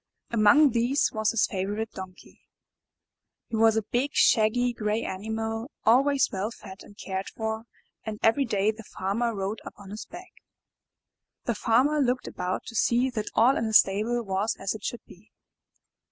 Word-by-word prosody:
Among 235 Hz, +6 st, +5 dB
these 240 Hz, +5 st, +1 dB
was 215 Hz, -1 st, +1 dB
his 230 Hz, -, +2 dB
favorite 205 Hz, +3 st, -3 dB
Donkey. 185 Hz, -1 st, -11 dB, 1.1 s
He -, -, -3 dB
was 225 Hz, 0 st, +4 dB
a 220 Hz, -, +1 dB
big, 250 Hz, +7 st, -2 dB
shaggy, 240 Hz, +2 st, +3 dB
gray 215 Hz, 0 st, -1 dB
animal, 220 Hz, +4 st, -4 dB, 0.2 s
always 270 Hz, +4 st, +4 dB
well 195 Hz, +2 st, -2 dB
fed 195 Hz, -4 st, -12 dB
and 205 Hz, -, -15 dB
cared 190 Hz, 0 st, -4 dB
for, 220 Hz, 0 st, -4 dB, 0.4 s
and 215 Hz, -1 st, -5 dB
every 250 Hz, +5 st, +3 dB
day 210 Hz, -2 st, +1 dB
the 220 Hz, +1 st, -11 dB
Farmer 220 Hz, +3 st, -2 dB
rode 195 Hz, +2 st, -3 dB
upon 200 Hz, -1 st, -11 dB
his 210 Hz, -, -7 dB
back. 360 Hz, +2 st, -11 dB, 1.1 s
The 235 Hz, -, 0 dB
Farmer 255 Hz, +8 st, +2 dB
looked 255 Hz, -2 st, 0 dB
about 180 Hz, +1 st, -3 dB
to 230 Hz, -, -9 dB
see 245 Hz, +4 st, +2 dB
that 215 Hz, -4 st, -3 dB
all 250 Hz, +4 st, +5 dB
in 225 Hz, -, -1 dB
the 220 Hz, -, -1 dB
stable 215 Hz, +6 st, +3 dB
was 195 Hz, +3 st, -1 dB
as 195 Hz, -, -2 dB
it 215 Hz, -, -10 dB
should 240 Hz, -, -5 dB
be. 190 Hz, +4 st, -18 dB
220 Hz, 165 wpm, -26 LUFS, 205-240 Hz, 1.1 s, Among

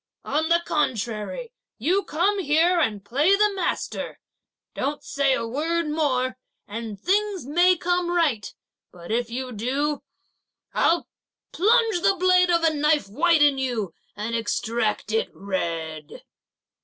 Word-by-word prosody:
on 315 Hz, +2 st, 0 dB
the 340 Hz, 0 st, +3 dB
contrary, 260 Hz, -, -2 dB, 0.2 s
you 355 Hz, -, +1 dB
come 375 Hz, +5 st, 0 dB
here 340 Hz, +2 st, +3 dB
and 210 Hz, -10 st, -1 dB
play 290 Hz, -, +3 dB
the 420 Hz, +1 st, +3 dB
master; 385 Hz, -, -3 dB, 0.6 s
don't 290 Hz, +2 st, -3 dB
say 280 Hz, -1 st, +1 dB
a -, -, -3 dB
word 325 Hz, +6 st, -1 dB
more, 255 Hz, -5 st, 0 dB, 0.3 s
and 215 Hz, -1 st, -6 dB
things 395 Hz, -, 0 dB
may 350 Hz, +6 st, +4 dB
come 355 Hz, +1 st, 0 dB
right; 315 Hz, -12 st, 0 dB, 0.4 s
but 175 Hz, +2 st, -10 dB
if 235 Hz, +1 st, 0 dB
you 255 Hz, +2 st, -4 dB
do, 270 Hz, +7 st, -1 dB, 0.7 s
I'll 340 Hz, +1 st, +2 dB, 0.4 s
plunge 435 Hz, 0 st, +3 dB
the 390 Hz, -, +3 dB
blade 365 Hz, 0 st, +4 dB
of 340 Hz, -1 st, +2 dB
a 325 Hz, -1 st, +3 dB
knife 300 Hz, -3 st, +2 dB
white 315 Hz, -, +3 dB
in 285 Hz, -2 st, +4 dB
you 235 Hz, -9 st, -2 dB, 0.2 s
and 215 Hz, +3 st, -3 dB
extract 225 Hz, -1 st, -1 dB
it 225 Hz, 0 st, 0 dB
red." 165 Hz, -5 st, -4 dB
295 Hz, 135 wpm, -24 LUFS, 230-345 Hz, 0.7 s, may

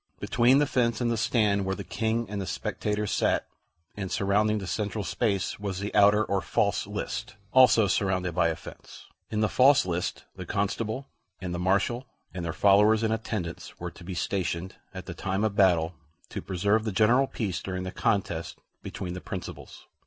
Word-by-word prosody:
Between 125 Hz, +2 st, +4 dB
the 145 Hz, -, +4 dB
fence 120 Hz, -5 st, +1 dB
and 120 Hz, -1 st, +1 dB
the -, -, +1 dB
stand 110 Hz, -3 st, +2 dB
where 95 Hz, 0 st, -1 dB
the -, -, -6 dB
King 115 Hz, +1 st, -1 dB
and 100 Hz, 0 st, -4 dB
the 95 Hz, -, -5 dB
spectators 105 Hz, -1 st, -2 dB
sat, -, -, +1 dB, 0.5 s
and 95 Hz, -2 st, -5 dB
surrounding 105 Hz, +2 st, +2 dB
the 100 Hz, -, -4 dB
central 105 Hz, +4 st, -2 dB
space, 100 Hz, -2 st, -1 dB
was 100 Hz, -3 st, -3 dB
the 100 Hz, +1 st, -4 dB
outer 105 Hz, +1 st, +5 dB
or 100 Hz, -1 st, 0 dB
false -, -, 0 dB
list, -, -, -4 dB, 0.2 s
also 120 Hz, -4 st, +6 dB
surrounded 90 Hz, -2 st, 0 dB
by 85 Hz, 0 st, +3 dB
a 80 Hz, -, -1 dB
fence. 80 Hz, -, -12 dB, 0.2 s
In 110 Hz, -1 st, -1 dB
the 110 Hz, -, +3 dB
false 135 Hz, +5 st, +5 dB
list 90 Hz, -1 st, -3 dB
the 95 Hz, -, -6 dB
Constable 110 Hz, +6 st, -2 dB, 0.3 s
and 90 Hz, -1 st, -4 dB
the 85 Hz, -, -3 dB
Marshal 100 Hz, +7 st, +1 dB, 0.3 s
and 90 Hz, -1 st, -4 dB
their 85 Hz, -, -2 dB
followers 105 Hz, +5 st, +4 dB
and 110 Hz, 0 st, +2 dB
attendants 105 Hz, -6 st, -5 dB
were -, -, -5 dB
to -, -, -14 dB
be 90 Hz, +1 st, -6 dB
stationed 90 Hz, 0 st, -2 dB, 0.2 s
at -, -, -8 dB
the -, -, -6 dB
time 95 Hz, +2 st, -2 dB
of 110 Hz, -2 st, 0 dB
battle 90 Hz, -4 st, +3 dB, 0.4 s
to -, -, -5 dB
preserve 100 Hz, +4 st, +1 dB
the 110 Hz, -, -2 dB
general 115 Hz, +7 st, +4 dB
peace 100 Hz, -9 st, -3 dB
during 95 Hz, -1 st, -4 dB
the 95 Hz, -, -4 dB
contest 85 Hz, -6 st, -1 dB, 0.2 s
between 90 Hz, -1 st, -5 dB
the 90 Hz, -, -6 dB
principals. 85 Hz, -7 st, -8 dB
100 Hz, 190 wpm, -27 LUFS, 95-110 Hz, 0.5 s, also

